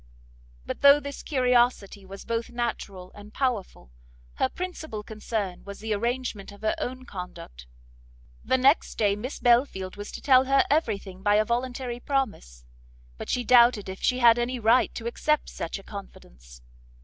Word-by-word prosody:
But - - -5
though 280 +1 +8
this 280 -1 -7
curiosity 245 -7 +1
was 195 +1 -10
both 230 0 -2
natural 215 -6 -4
and 205 0 -13
powerful, 235 - -2 0.5
her - - +1
principal 315 -12 -6
concern 210 -3 -4
was 200 0 -9
the 220 0 -2
arrangement 235 -2 -3
of 205 - -15
her 220 - +1
own 255 +1 -5
conduct; 180 - -9 0.8
the 260 - +2
next 270 +4 +3
day 205 -2 +2
Miss 245 +7 -6
Belfield 235 -7 +1
was 205 0 -7
to - - -6
tell 260 -2 +5
her 275 0 +3
every 285 -9 +2
thing 190 -2 -12
by 205 +1 +3
a 215 +1 +3
voluntary 245 +1 -3
promise; 210 - -3 0.5
but - - -7
she 250 - 0
doubted 235 -4 +5
if 190 - -8
she 250 - +2
had 240 -1 +6
any 245 +2 -1
right 230 +2 +3
to 230 - -6
accept 300 +5 0
such 165 - -5
a 195 - -12
confidence. - - -12
230 Hz, 165 wpm, -26 LUFS, 200-255 Hz, 0.8 s, though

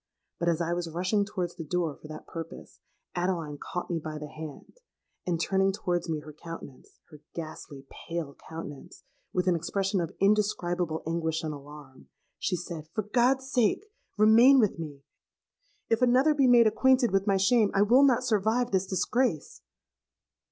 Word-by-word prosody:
But 170 +1 +1
as 170 0 0
I 170 0 0
was 175 -1 -3
rushing 185 +5 0
towards 180 -4 -4
the 165 - -6
door 165 -1 -1
for - - -13
that 155 0 -9
purpose, 165 -1 -9 0.3
Adeline 170 -5 -2
caught 180 -2 -5
me 170 - 0
by 155 0 -6
the 150 0 -7
hand; 155 - -10 0.5
and, 170 -2 0
turning 195 +3 +2
towards 180 -3 -2
me 155 -2 -2
her 150 0 -11
countenance—her 150 -1 -12
ghastly 155 -4 -8 0.2
pale 165 -4 -4
countenance, 160 0 -9 0.3
with 180 - 0
an 185 - +3
expression 190 +3 -1
of 165 - -5
indescribable 180 -5 +1
anguish 160 0 -1
and 155 -1 -3
alarm, 145 -2 -12 0.3
she 185 - 0
said, 170 -3 -7
'For 215 - 0
God's 260 +5 +1
sake, 245 - +2 0.3
remain 230 +6 +7
with 210 -7 +1
me! 145 -4 -7 0.8
If 225 +2 +1
another 255 +5 +4
be 275 -3 +3
made 240 -2 +7
acquainted 255 +1 +3
with 195 +1 +1
my 195 -1 +3
shame, 210 +2 +3
I 195 - +5
will 240 +6 +5
not 255 -3 +4
survive 230 +2 +1
this 190 -1 +1
disgrace.' 190 - -1
180 Hz, 165 wpm, -28 LUFS, 160-215 Hz, 0.8 s, remain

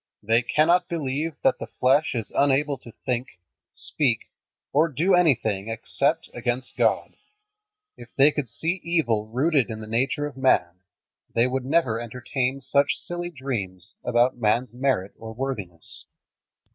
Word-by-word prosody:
They 115 +3 +3
cannot 170 +8 +3
believe 155 -1 -2
that 265 -1 +3
the - - -5
flesh 135 +3 +2
is 115 -3 -4
unable 140 +1 +2
to 115 - -13
think, 125 -6 -3 0.3
speak, 125 -7 -1 0.4
or 155 +4 +4
do 165 +6 +1
anything 115 - +2
except 140 +8 -1
against 120 +2 -3
God. - - +1 0.8
If - - -12
they 140 +2 +6
could 145 -5 -3
see 170 - -2
evil 120 -11 +1
rooted 135 +3 +1
in 110 -1 -5
the 110 - -7
nature 130 +7 0
of 145 -2 -7
man, 90 -9 +2 0.6
they 115 - +4
would 130 0 -2
never 135 -6 +2
entertain 125 +3 -2
such 140 +2 +2
silly 175 0 -5
dreams 110 - -5
about 120 +1 +2
man's 120 +1 +1
merit 125 -7 0
or 110 0 -8
worthiness. 105 -11 -6
130 Hz, 145 wpm, -25 LUFS, 115-150 Hz, 0.8 s, they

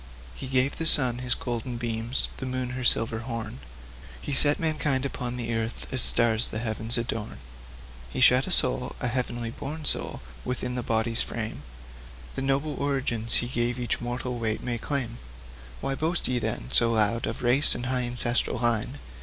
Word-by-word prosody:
He - - -8
gave 130 +1 0
the 165 - -2
sun 125 -6 +6
his 125 -1 -1
golden 120 0 -5
beams, 115 +1 -1
the 130 - -6
moon 130 -1 -4
her 130 0 -5
silver 115 -2 +3
horn; 115 0 -6 0.6
He 140 - -5
set 145 +2 +4
mankind 150 -4 0
upon 125 -2 -5
the 120 -1 -4
earth, 115 +1 -4
as 130 - +1
stars 115 -1 +7
the - - -5
heavens 110 +1 -1
adorn. 115 -2 -5 0.7
He - - -6
shut 130 +1 +4
a - - -5
soul 125 -5 0
a - - -2
heaven 120 -1 -3
born 155 +5 -7
soul - - +1 0.2
within 125 0 -4
the 125 - -3
body's 115 0 -1
frame; 110 -8 -5 0.7
The - - -4
noble 140 +3 -1
origin 130 -5 -2
he 115 - +4
gave 120 0 -1
each 120 -2 -3
mortal 120 0 -4
wight 110 -1 -2
may 120 -2 -2
claim. 120 -3 -2 0.6
Why 135 0 -1
boast 160 +5 0
ye, 125 -1 -1
then, - - -3
so 115 - +3
loud 115 +1 0
of - - -6
race 125 +5 +5
and 120 - -5
high 130 0 0
ancestral 120 +1 -1
line? 120 +3 0
120 Hz, 180 wpm, -25 LUFS, 115-130 Hz, 0.7 s, stars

